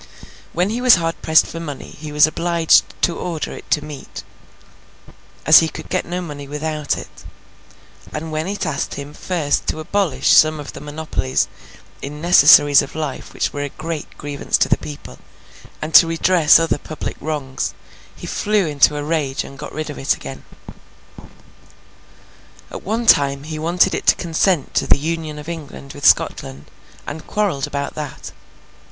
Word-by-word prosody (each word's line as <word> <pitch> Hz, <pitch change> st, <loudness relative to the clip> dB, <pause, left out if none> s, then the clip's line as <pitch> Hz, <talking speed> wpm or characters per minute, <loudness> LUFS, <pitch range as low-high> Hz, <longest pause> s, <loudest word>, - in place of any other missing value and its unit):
When 180 Hz, +4 st, 0 dB
he 240 Hz, +2 st, -3 dB
was 250 Hz, -1 st, +7 dB
hard 165 Hz, -1 st, -3 dB
pressed 160 Hz, 0 st, +4 dB
for 165 Hz, -, -7 dB
money 145 Hz, -5 st, -7 dB
he 150 Hz, 0 st, -9 dB
was 150 Hz, 0 st, +6 dB
obliged 165 Hz, +1 st, +3 dB, 0.2 s
to 170 Hz, -, +2 dB
order 170 Hz, -4 st, -4 dB
it -, -, -11 dB
to 150 Hz, -1 st, +1 dB
meet, 150 Hz, -2 st, -9 dB, 1.2 s
as 155 Hz, +1 st, +9 dB
he 160 Hz, -, 0 dB
could -, -, -10 dB
get -, -, -1 dB
no 180 Hz, +1 st, -3 dB
money 145 Hz, -4 st, -8 dB
without 150 Hz, 0 st, -3 dB
it; -, -, -11 dB, 0.9 s
and 155 Hz, +1 st, -5 dB
when 155 Hz, +2 st, -2 dB
it 200 Hz, 0 st, -3 dB
asked 145 Hz, -3 st, -3 dB
him 145 Hz, +1 st, -8 dB
first 155 Hz, -4 st, -1 dB
to 155 Hz, -, -2 dB
abolish 185 Hz, 0 st, 0 dB
some 155 Hz, 0 st, +5 dB
of 145 Hz, -, -8 dB
the -, -, -9 dB
monopolies 145 Hz, -6 st, -2 dB, 0.5 s
in 145 Hz, +2 st, -7 dB
necessaries 145 Hz, -3 st, +7 dB
of -, -, -8 dB
life 155 Hz, -4 st, -5 dB
which -, -, -2 dB
were 145 Hz, -, -4 dB
a 145 Hz, -, -3 dB
great 155 Hz, +1 st, -7 dB
grievance 145 Hz, -1 st, -2 dB
to -, -, +2 dB
the -, -, +2 dB
people, 145 Hz, -1 st, -10 dB, 0.6 s
and 155 Hz, +1 st, -5 dB
to 165 Hz, -, +8 dB
redress 165 Hz, -1 st, +4 dB
other 165 Hz, -3 st, 0 dB
public 155 Hz, -, -6 dB
wrongs, 145 Hz, -4 st, -3 dB, 0.4 s
he -, -, -10 dB
flew 210 Hz, -2 st, 0 dB
into 150 Hz, -1 st, +3 dB
a 145 Hz, -, -3 dB
rage 150 Hz, -3 st, -1 dB
and 135 Hz, -, -12 dB
got 150 Hz, -, -7 dB
rid 155 Hz, 0 st, -5 dB
of -, -, -9 dB
it 135 Hz, -, +1 dB
again. 70 Hz, 0 st, -9 dB, 2.3 s
At -, -, -7 dB
one 225 Hz, +4 st, -2 dB
time 140 Hz, -7 st, +4 dB
he 155 Hz, 0 st, -6 dB
wanted 175 Hz, +4 st, +2 dB
it -, -, -4 dB
to -, -, +6 dB
consent 170 Hz, -2 st, 0 dB
to -, -, 0 dB
the -, -, +5 dB
Union 155 Hz, 0 st, -4 dB
of 150 Hz, -, -9 dB
England 150 Hz, -4 st, -8 dB
with 145 Hz, -, +1 dB
Scotland, 65 Hz, +2 st, +1 dB, 0.3 s
and 155 Hz, +2 st, -8 dB
quarrelled 195 Hz, -10 st, -1 dB
about 140 Hz, 0 st, -4 dB
that. 150 Hz, -3 st, -7 dB
155 Hz, 170 wpm, -19 LUFS, 145-165 Hz, 2.3 s, as